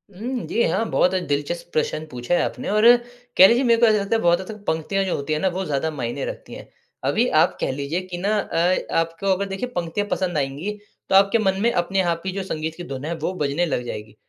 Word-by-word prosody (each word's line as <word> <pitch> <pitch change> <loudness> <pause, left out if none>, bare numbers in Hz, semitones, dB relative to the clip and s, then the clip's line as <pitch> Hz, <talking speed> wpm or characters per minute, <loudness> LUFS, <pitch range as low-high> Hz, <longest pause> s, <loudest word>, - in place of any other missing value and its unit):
हुँ। 245 +5 -4
जी 235 - 0
हाँ, 190 +7 +1
बहुत 180 - +2
अ, 185 - +2
दिलचस्प 145 +5 -2
प्रश्न 155 0 -1
पूछा 125 +6 -3
है - - +3
आपने - - -4
और 215 +2 +3 0.5
कह 190 - +10
लीजिए 240 +3 +3
मेरे 235 -2 +4
को 235 - +6
ऐसा 215 -1 +4
लगता 200 +3 0
है 225 - +1
बहुत 175 0 +3
हद 190 - -10
तक 215 -2 -9
पंक्तियाँ 160 +5 0
जो 185 - -1
होती 140 +2 -3
हैं 155 - 0
ना 190 - +1
वो 190 - -1
ज़्यादा 150 0 -1
मायने 135 -2 -4
रखती - - -7
हैं। - - -11 0.4
अभी - - +2
आप - - +3
कह - - 0
लीजिए 140 +6 -3
कि 175 - -3
ना 205 +4 0
अ 180 -1 +1 0.2
आपको 165 +4 -3
अगर 200 +2 -2
देखिए 195 +6 -4
पंक्तियाँ 175 +4 -2
पसंद 175 -4 -1
आएँगी 140 +8 -2 0.4
तो - - +3
आपके 195 +3 +5
मन 195 -2 +1
में 235 +1 +3
अपने 190 +1 0
आप 170 -2 -1
ही 190 - -1
जो 195 0 -4
संगीत 160 -3 -4
की 175 - -6
धुन 135 -3 -6
है 170 - -2
वो 165 +4 -2
बजने 145 +4 +1
लग 125 -7 -2
जाएगी। 105 -2 -7
175 Hz, 250 wpm, -22 LUFS, 155-195 Hz, 0.5 s, कह